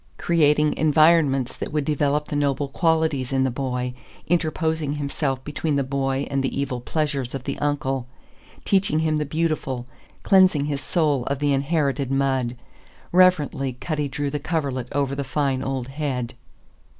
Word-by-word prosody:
Creating 150 -2 +3
environments 155 -4 +4
that - - -5
would 150 -2 -1
develop 150 0 +1
the - - -4
noble 145 -1 0
qualities 160 -3 +1
in 135 -1 +2
the 130 - +1
boy, 125 -1 -2 0.3
interposing 160 -3 0
himself 140 -2 -2
between 150 0 -2
the 140 - +1
boy 135 0 -1
and 135 0 +1
the 135 - -2
evil 130 -3 -2
pleasures 140 -3 -2
of 135 - -5
the 140 +1 -3
uncle, 135 -3 -1 0.6
teaching 195 -5 +2
him 155 -1 +1
the 150 - -1
beautiful, 150 -5 -2 0.4
cleansing 185 -7 +5
his 145 -1 -2
soul 150 -7 +1
of 140 - -1
the 145 0 +1
inherited 140 -1 0
mud. 135 -3 0 0.5
Reverently 155 -7 +3
Cutty 150 +3 -3
drew 140 +1 -3
the 150 - -2
coverlet 140 -5 -2
over 140 -1 0
the 140 0 -2
fine 135 -1 0
old 135 -2 -3
head. 135 -4 -3
140 Hz, 155 wpm, -23 LUFS, 135-155 Hz, 0.6 s, cleansing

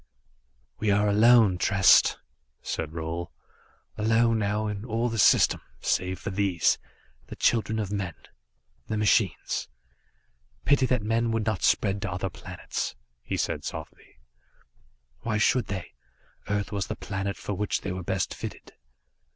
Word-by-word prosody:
"We 110 - 0
are 105 +1 +3
alone, 105 -2 +5
Trest," 95 -1 +5 0.5
said 80 - -3
Roal, 80 +1 -4 0.7
"alone, 115 +1 +3
now, 105 +1 0
in 105 -1 -4
all 115 +1 -1
the 115 -1 -3
system, - - +5 0.2
save 90 0 0
for 100 - -5
these, 95 -4 +2 0.5
the - - -8
children 110 -1 +1
of 105 -3 -2
men, 95 -5 -3 0.7
the 110 - -2
machines. 105 0 +1 1.0
Pity 140 -2 +4
that 125 -4 0
men 115 +2 +1
would 115 -1 -1
not 110 -4 -1
spread 100 -1 +2
to 105 -3 -3
other 95 +1 -3
planets," - - -5 0.3
he - - -3
said - - -2
softly. - - -8 1.0
"Why 110 - -1
should 120 +3 +2
they? 95 -3 -5 0.6
Earth 105 -1 -1
was 100 -2 -2
the - - -4
planet 100 0 -4
for 105 - -4
which 105 +2 -1
they 100 - -4
were 90 0 -4
best 95 +1 -2
fitted." - - -8
105 Hz, 145 wpm, -27 LUFS, 95-110 Hz, 1.0 s, alone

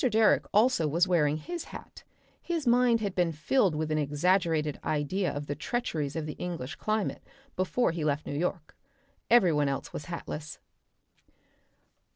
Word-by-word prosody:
Direck 225 -3 +4
also 215 -6 +3
was 170 +5 +2
wearing 155 -4 +2
his 340 - -6
hat, - - -11 0.4
his 335 -4 -2
mind 240 -1 +4
had 200 -3 -2
been 175 -3 +1
filled 160 - +1
with 155 0 -2
an 155 - +1
exaggerated 155 0 +1
idea 155 +6 0
of 145 0 -5
the 145 - -3
treacheries 150 - -3
of 160 -2 -2
the 150 - -4
English 165 -6 -4
climate 215 -2 -1 0.3
before 185 +4 +1
he 165 -1 -3
left 150 0 0
New - - -4
York. 160 +1 -3 0.5
Every 210 -8 +5
one 145 -1 +2
else 135 - -4
was 145 - -6
hatless.) 155 -4 -6
165 Hz, 160 wpm, -29 LUFS, 150-210 Hz, 0.5 s, Every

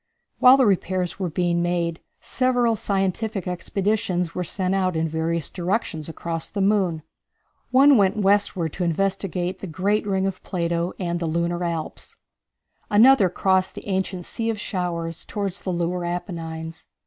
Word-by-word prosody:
While 255 +1 +8
the 265 - +4
repairs 185 -2 0
were 185 -2 -1
being 170 +1 0
made 170 -1 -1 0.2
several 245 -3 +1
scientific 195 0 -1
expeditions 185 0 -1
were 180 - -2
sent 185 +2 -1
out 185 -2 +1
in 160 0 0
various 160 0 -1
directions 175 -4 -2
across 165 0 -4
the 205 - -5
moon. 190 -5 +1 0.7
One 275 +1 +6
went 195 0 +3
westward 195 -5 +2
to 180 - -3
investigate 185 +1 -1
the 195 - -6
great 200 +6 0
ring 190 -1 +1
plain - - +1
of 190 -1 -3
Plato, 170 -1 -1
and 175 -2 -2
the 170 - -2
lunar 170 +2 -1
Alps. 165 -2 -4 0.7
Another 220 -1 +6
crossed 190 +1 +1
the - - -9
ancient 190 -2 -2
Sea 230 -1 -3
of 220 -2 -2
Showers 170 -5 -3
toward 200 -2 -3
the 185 - -6
lunar 175 +1 -1
Apennines. 165 -2 -5
185 Hz, 155 wpm, -23 LUFS, 170-200 Hz, 0.7 s, While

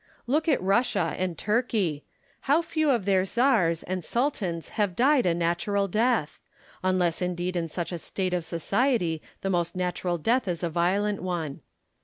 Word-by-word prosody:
Look 300 +7 +1
at 295 - +3
Russia 195 -4 +1
and 180 -2 -2
Turkey: 210 - 0 0.5
how 310 +4 +4
few 315 -2 0
of 235 -8 +2
their 190 -2 +3
czars 195 -7 +2
and 185 0 -3
sultans 200 - -1
have 205 -5 -1
died 260 0 +4
a 170 - +2
natural 175 +4 0
death! 220 -4 +1 0.2
— - - -27
unless 185 -3 +1
indeed 180 0 -2
in 170 -1 -1
such 170 +2 -4
a 175 - -4
state 185 +2 -3
of 180 -2 0
society 175 - 0 0.2
the 195 - -1
most 175 -1 0
natural 180 -1 -1
death 230 +8 +1
is 175 -1 -2
a 170 - -1
violent 195 +5 +1
one. 170 -6 -3
185 Hz, 170 wpm, -27 LUFS, 170-230 Hz, 0.5 s, how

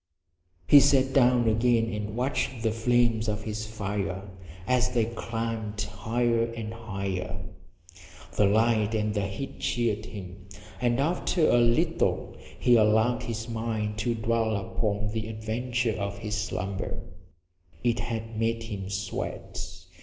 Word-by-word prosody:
He 145 - +9
sat 135 -1 +4
down 125 -3 +5
again 115 0 +3
and 105 0 -4
watched 130 -1 -1
the 110 - +2
flames 115 0 +2
of 105 0 -1
his 110 0 -4
fire 100 -2 -3 0.4
as 125 +2 +2
they 115 -3 +3
climbed 115 -2 -4
higher 115 +3 0
and 115 -1 -5
higher. 95 -4 -4 1.0
The 105 - +4
light 110 +1 +3
and 105 -1 0
the 100 -2 0
heat 100 +8 -6
cheered 110 -3 0
him, 95 -4 -9 0.3
and 120 0 +2
after 165 +2 +2
a 120 - +5
little 120 0 +2 0.2
he 120 -1 +5
allowed 110 +2 +3
his 115 0 -4
mind 110 -2 -2
to 120 +1 0
dwell 110 0 +1
upon 105 0 -1
the 110 0 -3
adventure 115 +2 -1
of 100 0 -3
his 105 +1 -5
slumber. 95 -2 -3 0.8
It 120 -1 +2
had 115 -1 -4
made 115 0 0
him 100 -4 -5
sweat. 95 -1 -4
110 Hz, 135 wpm, -28 LUFS, 105-120 Hz, 1.0 s, He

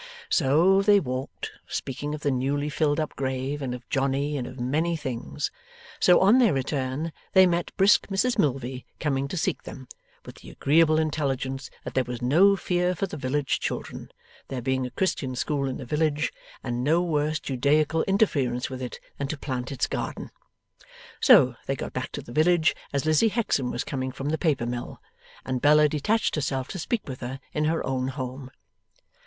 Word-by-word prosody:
So, 170 +6 +4
they 205 0 +5
walked, 130 -4 -5 0.2
speaking 145 +3 -4
of 150 - -9
the 145 - +1
newly 140 +3 0
filled 150 0 +1
up 155 - -3
grave, 130 +2 -2
and 125 -2 -3
of 125 - -12
Johnny, 140 +2 0
and 130 -3 -3
of 130 0 -10
many 155 +7 0
things. 115 - -4 0.5
So, 180 - +6
on 205 +7 +6
their 230 -9 +4
return, 135 +3 -2 0.2
they 190 -1 +8
met 175 -1 0
brisk 200 +1 +5
Mrs 220 +5 0
Milvey 130 -4 0 0.2
coming 140 -3 0
to 180 - -5
seek - - -1
them, 130 -2 -10 0.4
with - - -11
the - - -12
agreeable 155 +2 +3
intelligence 140 -3 -1
that - - -6
there 130 - +2
was 125 -1 -6
no 175 +11 +5
fear 180 -1 0
for 195 - -1
the 180 - -7
village 135 0 -1
children, - - -5 0.4
there 130 - -4
being 130 +1 -1
a - - -8
Christian 135 -6 -1
school 140 +1 -1
in 130 - -4
the 130 - -7
village, 150 +2 0 0.3
and 120 -1 -2
no 165 +5 +3
worse 155 -2 0
Judaical 150 +4 +1
interference 140 - +1
with 130 0 -6
it 125 - -6 0.2
than 140 - -1
to 155 - -4
plant 130 -2 -4
its 135 - 0
garden. - - -4 0.9
So, 125 -1 +7
they 135 - 0
got - - -6
back 130 0 -4
to - - -5
the 120 - -11
village 160 +2 +3 0.2
as 140 +1 -1
Lizzie 155 +8 +4
Hexam 200 - 0
was 120 - -2
coming 130 -2 -3
from 135 +3 -4
the 160 - -1
paper 145 -8 +1
mill, 120 0 -5 0.5
and 130 -1 -2
Bella 150 +1 +6
detached 185 +10 0
herself 135 -3 -1
to 190 - -5
speak 225 +6 -2
with 130 -2 -6
her 130 +2 -5
in 150 - 0
her 160 +1 0
own 130 -1 -1
home. 130 0 -5
145 Hz, 185 wpm, -26 LUFS, 130-160 Hz, 0.9 s, they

